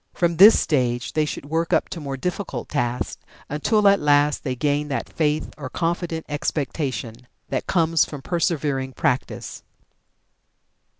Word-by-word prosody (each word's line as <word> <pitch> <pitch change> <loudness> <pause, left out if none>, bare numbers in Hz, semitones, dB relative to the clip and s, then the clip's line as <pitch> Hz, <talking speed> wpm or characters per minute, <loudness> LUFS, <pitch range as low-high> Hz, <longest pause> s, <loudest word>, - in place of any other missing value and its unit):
From 170 -2 +1
this 205 +5 +9
stage 125 -5 0
they 155 0 +2
should 150 - -5
work 165 +3 -1
up - - +3
to 170 - -6
more 140 -3 -5
difficult 180 +7 -4
tasks, 125 -4 -2 0.3
until 205 +8 +2
at 200 0 +5
last 145 0 +3
they 130 -2 -2
gain 145 +2 0
that 140 - -3
faith 155 -1 -1
or 135 -3 -5
confident 170 0 -2
expectation 130 -5 -3 0.2
that - - -2
comes 165 -3 +3
from 145 -3 -7
persevering 145 -6 -1
practice. 130 -1 -2
150 Hz, 140 wpm, -23 LUFS, 135-165 Hz, 0.3 s, this